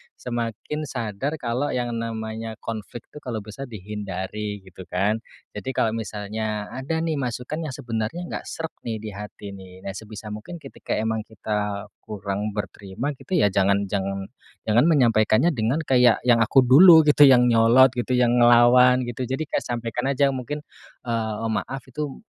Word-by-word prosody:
semakin 120 +5 -4
sadar 120 +4 -3
kalau 130 +1 -2
yang 120 -1 -1
namanya 110 -1 -4
konflik 115 +1 -6
tuh, 150 - -10
kalau 115 -7 -5
bisa 125 +6 -8
dihindari 100 -3 -6 0.3
gitu 95 -1 -12
kan. 100 +5 +1 0.4
Jadi, 130 +5 -4
kalau 110 - +1
misalnya 105 0 -4
ada 155 +5 -3
nih 160 -3 -1
masukan 130 +5 -4
yang 135 - -5
sebenarnya 120 +3 -4
enggak - - -5
sreg 160 0 -5 0.2
nih 115 -2 -2
di 110 - -6
hati 105 0 -8
nih, 95 -1 -13
nah - - -6
sebisa 105 0 -9
mungkin 110 +11 -8
ketika 135 - -6
emang 110 0 -1
kita 105 -2 -4 0.2
kurang 105 0 -4
berterima 105 +5 -5
gitu, - - -8
ya 105 - +4
jangan 100 +1 +1
jangan 100 0 -3 0.4
jangan 115 +6 +4
menyampaikannya 120 -3 +4
dengan 120 +7 0
kayak 125 -5 +4
yang 120 -2 +5
aku 135 - +5
dulu 160 +6 +8
gitu, 145 0 +7
yang 125 -3 +6
nyolot 120 +3 +6
gitu, 120 +1 -1
yang 125 0 +3
ngelawan 120 +1 +6
gitu. 120 +1 -4
Jadi 135 +5 -2
kayak - - -2
sampaikan 120 0 -3
aja 140 +1 +3
mungkin, 135 +3 -5 0.4
eee, 115 -2 -2
"Maaf, 135 +5 -3
itu 145 +1 -5
115 Hz, 160 wpm, -24 LUFS, 105-130 Hz, 0.4 s, dulu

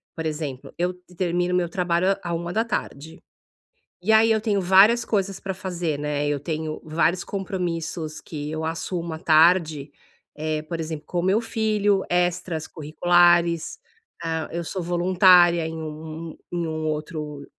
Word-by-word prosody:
por 160 - -5
exemplo, 150 -4 -5
eu 180 +1 0
t 180 0 -21
termino 175 0 0
o - - +3
meu 175 -2 0
trabalho 180 +1 +1
à - - -2
à - - -1
13h, 170 - -3 0.8
e 215 +5 +1
aí 225 +1 +6
eu 220 -1 +3
tenho 205 -3 0
várias 195 +6 +5
coisas 195 -2 -1
pra 195 - -4
fazer, 175 -5 -3
né, 145 0 -1
eu 145 -1 0
tenho 155 +1 -4
vários 165 +3 +1
compromissos 170 -5 -4
que 150 -2 -6
eu 160 0 -3
assumo 165 +1 -3
à - - -6
tarde, 160 -3 +3 0.5
eh, 155 0 -2
por 165 +1 -5
exemplo, 160 -1 -5
com 175 - -3
o - - -4
meu 195 +5 +2
filho, 210 -3 +1
extracurriculares. 175 0 +2 0.4
Ah, 160 -1 -2
eu 170 0 -2
sou 185 +3 -4
voluntária 175 -1 +5
em 160 0 -5
um 160 +1 -7
um - - -14
em 170 -1 -1
um 155 0 -3
outro 150 -2 -4
170 Hz, 160 wpm, -24 LUFS, 155-185 Hz, 0.8 s, aí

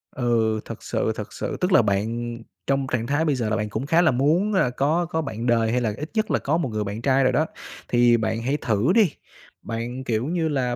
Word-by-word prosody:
Ừ, 115 -3 +1
thật - - -8
sự, - - -1
thật - - -7
sự, - - -4
tức 180 +1 +1
là - - +7
bạn 115 +3 -1 0.3
trong 135 -1 +1
trạng 115 -2 -1
thái 145 +4 +1
bây 150 -3 +2
giờ 115 -4 -1
là 110 - +1
bạn 105 -1 -2
cũng 110 +5 -3
khá 165 +4 +3
là 160 - +4
muốn 160 +11 +2
là 190 -10 +3
có 150 +7 +1
có 160 -2 -1
bạn 115 -6 -5
đời 115 -2 +2
hay 125 +1 +1
là 110 -3 0
ít 150 +2 -5
nhất 220 -1 0
là - - +2
có 150 +4 0
một 165 -7 -1
người 110 -1 -2
bạn 105 +2 -5
trai 135 +1 +3
rồi 130 - +3
đó, 155 +5 +2 0.4
thì 120 -1 +4
bạn 110 0 -1
hãy 135 +5 0
thử 115 - +1
đi, 210 -8 +5 0.5
bạn, 120 +3 -5
kiểu 115 -2 -1
như 165 +1 0
là, 125 -4 0
125 Hz, 250 wpm, -24 LUFS, 115-150 Hz, 0.5 s, là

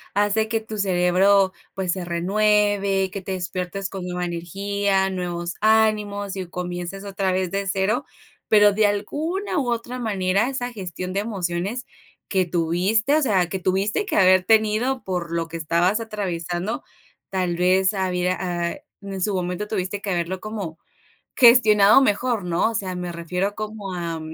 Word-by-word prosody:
hace 205 +2 +2
que 225 +1 0
tu 220 -1 -7
cerebro, 190 +1 +3 0.2
pues, 190 -2 -1
se 185 0 -3
renueve, 200 +2 +1
que 200 - -5
te 190 +1 -4
despiertes 185 +1 -4
con 190 -2 -6
nueva 180 0 -3
energía, 195 +3 -1
nuevos 175 -2 -3
ánimos 210 -2 +2
y 190 -2 -5
comiences 180 +2 -5
otra 195 -1 -1
vez 185 -1 -1
de 195 0 -2
cero, 200 +8 0 0.4
pero, 210 -1 +6
de 210 +1 +3
alguna 305 - -2
u 260 -3 -1
otra 240 +2 -3
manera, 200 0 +1
esa 250 -2 -3
gestión 185 -3 -6
de 195 - 0
emociones 195 +2 -3 0.4
que 190 -2 +1
tuviste, 180 - +1
o 310 - +3
sea, 195 -10 +2
que 190 - -3
tuviste 195 - 0
que - - -2
haber 185 -1 +5
tenido 220 +5 +2
por 180 -3 -3
lo 165 -1 -1
que 165 +1 -6
estabas 170 +6 +1
atravesando, 190 -2 -3 0.5
tal 185 -2 -1
vez 185 +2 +3
había, 185 -2 0 0.4
eh, - - -10 0.2
en 195 -1 -6
su 205 +3 0
momento 180 +3 -2
tuviste 200 -1 -3
que 205 - -4
haberlo 180 0 -1
como 200 -7 -6 0.6
gestionado 220 -3 +7
mejor, 235 -3 +1
¿no? 175 +5 +1
O - - -7
sea, 190 -4 -2
me 180 -1 -4
refiero 180 +4 -2
como 215 -2 -6
a 170 -2 -4
195 Hz, 160 wpm, -23 LUFS, 180-215 Hz, 0.6 s, gestionado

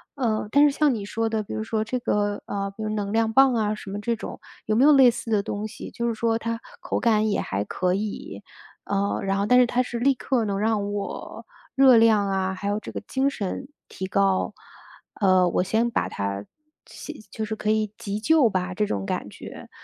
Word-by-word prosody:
呃， 225 -6 -1
但 285 +3 +5
是 295 - +5
像 300 -3 +4
你 210 -4 -4
说 225 +2 -1
的 220 -1 -1
比 205 - -7
如 110 0 -2
说 215 - -1
这 240 +3 -2
个 205 -3 -1
呃， 200 0 -3
比 220 - -5
如 215 - -2
能 205 -1 -2
量 225 0 +2
棒 270 +2 +5
啊， 215 -2 +1
什 210 - -10
么 200 +1 -4
这 235 +2 0
种 - - -8 0.3
有 215 - 0
没 240 - +4
有 300 - +7
类 270 -3 +7
似 230 -1 -5
的 210 -2 +3
东 205 +1 -4
西， 220 - -9
就 235 0 -2
是 235 - 0
说 225 0 +1
它 230 0 -3 0.2
口 - - -2
感 220 -2 +2
也 200 - 0
还 100 +1 -2
可 180 - -1
以。 215 - -4 0.4
呃， 200 0 -1
然 195 0 0
后 200 - +1
但 250 +3 +5
是 250 - +6
它 245 +1 +1
是 240 -1 -5
立 275 +3 +4
刻 255 -1 0
能 200 -1 -2
让 210 -1 0
我 205 -1 -6 0.3
热 265 -3 +7
量 220 -3 +4
啊， 190 -1 -1
还 190 +2 -5
有 205 +1 0
这 - - -9
个 - - -4
精 270 +1 +1
神 230 +1 -4 0.2
提 190 - -6
高。 195 -1 +1 0.7
呃， 185 -2 +4
我 175 - +1
先 220 +5 +1
把 - - -1
它 100 0 -3 0.4
急 310 -6 -10
就 220 - -3
是 220 0 -4
可 215 0 -3
以 215 -1 0
急 205 0 -4
救 285 +1 +4
吧， 185 -2 -2
这 210 +3 0
种 100 - -2
感 - - -3
觉， - - -11
215 Hz, 245 characters per minute, -24 LUFS, 200-235 Hz, 0.7 s, 有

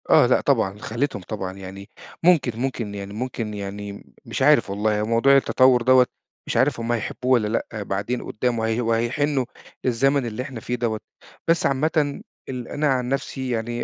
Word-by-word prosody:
آه. - - +7
لأ - - +3
طبعًا، 95 +1 +1
خلّيتهم 115 -1 -2
طبعًا 95 0 -5
يعني 95 +1 -9 0.3
ممكن 135 -10 +3
ممكن 120 -5 -3
يعني 100 0 -6
ممكن 115 -1 -4
يعني 100 0 -7
مش - - -4
عارف - - +5
والله، 105 +1 0
هو - - 0
موضوع 115 +5 +4
التطوّر 130 -2 +4
دوّة 130 +1 +6 0.4
مش - - -1
عارف 130 -2 +2
هم 115 +1 -2
هيحبّوه 120 +2 -2
والّا 115 -4 +3
لأ، 110 -1 -3
بعدين 100 +6 -2
قُدّام 120 +1 -1
وهي 110 +1 0
وهيحنّوا 125 +4 +1 0.4
للزمن 135 +2 +2
اللي 115 +1 -4
إحنا 130 -3 -7
فيه 120 +2 -3
دوّة، 115 -3 -1 0.5
بس 165 0 +3
عامةً 145 +3 +1 0.3
ال 125 -2 -5
أنا 150 +1 -1
عن 125 -3 +1
نفسي 135 -1 -3
يعني 120 0 -2
120 Hz, 175 wpm, -23 LUFS, 105-130 Hz, 0.5 s, آه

